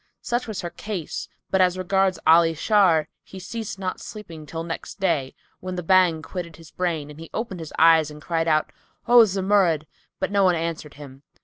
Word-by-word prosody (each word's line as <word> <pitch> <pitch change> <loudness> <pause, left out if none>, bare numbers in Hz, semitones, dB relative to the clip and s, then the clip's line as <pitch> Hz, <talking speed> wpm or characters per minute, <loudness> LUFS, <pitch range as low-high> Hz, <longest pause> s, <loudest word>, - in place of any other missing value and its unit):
Such 240 0 -2
was 215 -3 -4
her 175 - -5
case; 185 -2 -5 0.2
but 190 - +3
as 180 0 +3
regards 190 0 +1
Ali 165 0 +5
Shar, 175 -4 +3
he 190 - -13
ceased 200 +3 -6
not 185 -1 -4
sleeping 165 -8 -10
till 165 +1 -5
next 165 +4 -7
day, 140 -8 0 0.2
when 185 0 -5
the 180 - -4
Bhang 175 -2 +3
quitted 170 -3 -6
his 165 -2 -15
brain 165 -5 -2
and 150 - -13
he 165 - -10
opened 215 -5 -4
his 160 -2 -8
eyes 160 -2 +5
and 150 0 -11
cried 165 +1 -1
out, 155 -1 +2 0.4
"O 240 +1 +7
Zumurrud"; 190 -5 +2 0.3
but - - -2
no 200 -1 +3
one 180 -2 +4
answered 165 -2 -4
him. 140 -2 -12
175 Hz, 195 wpm, -24 LUFS, 160-190 Hz, 0.4 s, O